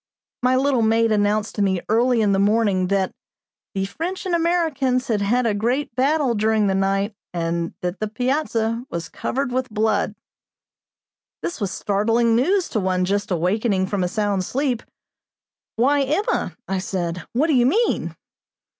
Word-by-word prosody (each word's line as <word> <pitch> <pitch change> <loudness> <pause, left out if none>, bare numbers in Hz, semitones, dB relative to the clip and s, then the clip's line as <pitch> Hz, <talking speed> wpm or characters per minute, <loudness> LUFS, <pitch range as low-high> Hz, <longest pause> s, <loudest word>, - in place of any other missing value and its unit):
My 250 +1 +3
little 265 -2 +2
maid 225 0 +3
announced 210 0 +1
to 210 - -2
me 190 -2 +2
early 235 +2 +3
in 205 -2 +3
the 195 - +2
morning 200 -3 +2
that 195 0 0 0.6
"the 195 0 0
French 335 - -5
and 365 - -1
Americans 315 -7 +1
had 210 -3 +1
had 240 +5 +1
a 225 - +2
great 240 +5 -1
battle 275 -1 +2
during 220 0 +2
the 195 - +2
night 195 +2 0 0.2
and 170 0 -2
that 180 +1 -3
the 215 - -1
piazza 235 -1 -1
was 170 0 -5
covered 275 0 -2
with 255 0 -1
blood." 215 -1 0 1.3
This 340 -8 -4
was 200 - 0
startling 225 +5 +1
news 360 - +2
to 220 - -1
one 185 -1 0
just 200 +2 -1
awakening 190 +3 +1
from 195 -1 -1
a - - +1
sound 205 -1 0
sleep. 255 +2 -1 0.9
"Why, 280 +5 +3
Emma!" 305 +10 -1
I 190 -1 -1
said, 180 -2 -3
"what 265 +6 +2
do 320 - +2
you 245 -2 +4
mean?" 450 - +1
220 Hz, 165 wpm, -22 LUFS, 195-255 Hz, 1.3 s, you